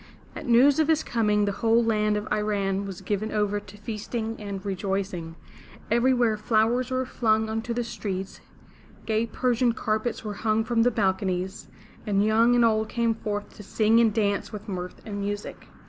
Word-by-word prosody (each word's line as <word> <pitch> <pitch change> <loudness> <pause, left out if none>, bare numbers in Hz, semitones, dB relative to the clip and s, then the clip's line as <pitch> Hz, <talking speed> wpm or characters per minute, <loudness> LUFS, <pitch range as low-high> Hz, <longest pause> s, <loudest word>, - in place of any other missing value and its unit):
At - - -7
news 260 +5 +5
of 315 - +3
his 315 -1 +2
coming 210 -3 +1
the 200 - 0
whole 230 +3 +2
land 210 -2 +1
of 210 - -4
I 210 - +1
ran' 200 -2 -1
was 190 -3 -7
given 210 +1 -2
over 205 -1 0
to 205 - -14
feasting 220 +1 -4
and 200 -2 -6
rejoicing. 190 -4 -3 0.6
Every 240 +3 +4
where 240 -4 +2
flowers 225 +3 +1
were 255 0 -1
flung 220 -3 +1
into 225 +2 -3
the 240 +1 -1
streets, 195 -4 -5 0.6
gay 220 +1 0
Persian 245 +1 +1
carpets 220 +2 -2
were 210 -1 -4
hung 220 0 +2
from 230 0 +1
the 240 - +5
balconies, 190 -3 -1 0.4
and 200 0 +2
young 225 +3 +4
and 240 -1 +5
old 220 -1 +1
came 235 -2 +1
forth 205 -2 -5
to - - -9
sing 220 +2 +2
and 230 -2 +4
dance 205 -1 0
with 210 0 -8
mirth 180 -2 -5
and 205 -2 -5
music. 205 +1 -5
215 Hz, 180 wpm, -26 LUFS, 205-230 Hz, 0.6 s, news